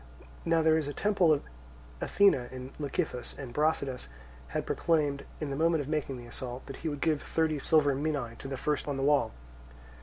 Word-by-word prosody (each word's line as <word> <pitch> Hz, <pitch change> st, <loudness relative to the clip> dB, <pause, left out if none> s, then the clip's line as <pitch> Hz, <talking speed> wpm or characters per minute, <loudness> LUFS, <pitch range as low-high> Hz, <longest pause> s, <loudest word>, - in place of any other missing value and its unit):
Now 165 Hz, -1 st, +3 dB
there 160 Hz, 0 st, +5 dB
is 150 Hz, -, -3 dB
a 145 Hz, -, -4 dB
temple 200 Hz, -5 st, +3 dB
of 150 Hz, -, +2 dB, 0.6 s
Athene 200 Hz, -1 st, +5 dB
in 130 Hz, +1 st, -5 dB
Lecythus, 145 Hz, -3 st, -2 dB
and 130 Hz, -4 st, -7 dB
Brasidas 140 Hz, -, 0 dB, 0.4 s
had -, -, -2 dB
proclaimed 145 Hz, -4 st, +1 dB
in 150 Hz, -3 st, -3 dB
the -, -, -1 dB
moment 165 Hz, +1 st, +3 dB
of 140 Hz, -, -5 dB
making 150 Hz, -3 st, -1 dB
the 120 Hz, -, -9 dB
assault 125 Hz, +1 st, -6 dB
that 135 Hz, -, -7 dB
he 160 Hz, -, -3 dB
would 145 Hz, -2 st, -5 dB
give 155 Hz, -3 st, +2 dB
thirty 160 Hz, -2 st, 0 dB
silver 145 Hz, 0 st, +4 dB
minae 140 Hz, -4 st, -1 dB
to -, -, -6 dB
the 135 Hz, -, -4 dB
man -, -, -3 dB
first 150 Hz, -1 st, 0 dB
on 140 Hz, -2 st, -1 dB
the 135 Hz, -, -1 dB
wall. 145 Hz, 0 st, +3 dB
145 Hz, 205 wpm, -30 LUFS, 135-160 Hz, 0.6 s, there